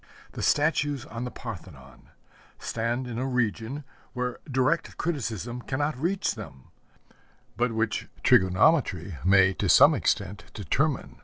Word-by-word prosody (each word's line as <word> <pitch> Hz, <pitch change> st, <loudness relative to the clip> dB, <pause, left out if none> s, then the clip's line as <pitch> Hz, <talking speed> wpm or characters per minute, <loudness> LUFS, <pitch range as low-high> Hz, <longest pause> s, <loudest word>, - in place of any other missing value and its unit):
The -, -, -6 dB
statues 145 Hz, -3 st, +1 dB
on 115 Hz, +2 st, -6 dB
the -, -, -3 dB
Parthenon 85 Hz, -, -10 dB, 0.5 s
stand 120 Hz, +3 st, -2 dB
in 120 Hz, -1 st, -5 dB
a 130 Hz, -, -1 dB
region 125 Hz, +2 st, -1 dB, 0.3 s
where 125 Hz, -1 st, -3 dB
direct 130 Hz, +5 st, 0 dB
criticism 120 Hz, -, -3 dB
cannot 145 Hz, +4 st, -2 dB
reach 175 Hz, +9 st, 0 dB
them, 80 Hz, -, -11 dB, 0.8 s
but 120 Hz, 0 st, +1 dB
which 110 Hz, 0 st, -1 dB, 0.2 s
trigonometry 95 Hz, -, +3 dB
may, 95 Hz, 0 st, +5 dB
to 80 Hz, -, -2 dB
some -, -, +8 dB
extent, 100 Hz, +3 st, -1 dB
determine. 130 Hz, -, -1 dB
120 Hz, 125 wpm, -27 LUFS, 100-135 Hz, 0.8 s, some